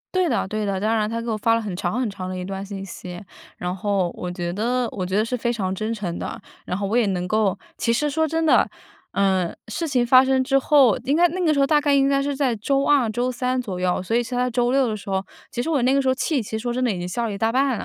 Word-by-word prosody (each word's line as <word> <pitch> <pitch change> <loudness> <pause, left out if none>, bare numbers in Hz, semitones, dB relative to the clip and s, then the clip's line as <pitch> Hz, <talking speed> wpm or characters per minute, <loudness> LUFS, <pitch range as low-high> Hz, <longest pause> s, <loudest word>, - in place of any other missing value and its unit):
对 365 -2 +2
的 235 - 0
对 215 +1 -2
的。 195 -1 -1
当 215 +3 +1
然 215 -1 0
她 230 0 -3
给 235 - -5
我 220 - 0
发 230 +2 +2
了 230 - 0
很 205 -5 -4
长 180 +6 -2
很 245 -4 0
长 185 -2 -6
的 185 - -4
一 180 - -4
段 195 +1 -5
信 195 -1 -6
息， 180 -1 -8 0.4
然 180 0 -3
后 195 -2 0
我 180 0 -4
觉 175 -1 -3
得 240 +4 0
我 185 -2 -3
觉 190 +2 -1
得 215 - +2
是 250 - -2
非 240 0 -1
常 190 -5 -2
真 215 +3 -2
诚 185 -6 -4
的， - - -6 0.2
然 180 - -2
后 200 -1 -2
我 220 - -1
也 240 -2 +4
能 180 -2 -1
够 210 -1 +1 0.2
其 230 - 0
实 295 +6 +1
说 320 +3 +1
真 325 +1 -1
的， 310 - +5 0.5
呃， 190 -3 +1
事 225 +10 -3
情 255 -6 +1
发 255 +1 +7
生 265 0 +2
之 270 +1 +2
后， 270 -5 +4
应 280 +4 +1
该 350 +1 +6
那 360 +2 -3
个 310 - +4
时 280 - 0
候 275 - +4
大 300 -1 +4
概 290 -1 +2
应 275 -1 +4
该 275 0 +2
是 285 0 -1
在 265 -4 0
周 275 +6 0
二 275 -6 +3
周 245 +3 -1
三 255 0 -1
左 195 -7 -5
右， 180 0 0
所 225 +5 -2
以 240 - +3
是 250 - -7
她 250 0 +1
周 245 0 +1
六 270 -2 +3
的 215 - -2
时 200 -1 -9
候， 190 0 0 0.3
其 245 -3 -2
实 270 - -3
我 290 -6 +2
那 255 +2 +3
个 275 - +3
时 265 - -2
候 260 - +4
气 285 0 0
其 210 - -9
实 220 - -2
说 240 +1 -2
真 255 +1 -2
的 250 - +2
已 190 - -3
经 175 - -4
消 235 +6 -2
了 210 - -4
一 200 - -5
大 225 +2 +1
半 265 -1 +2
了， - - -5
230 Hz, 335 characters per minute, -23 LUFS, 195-265 Hz, 0.5 s, 发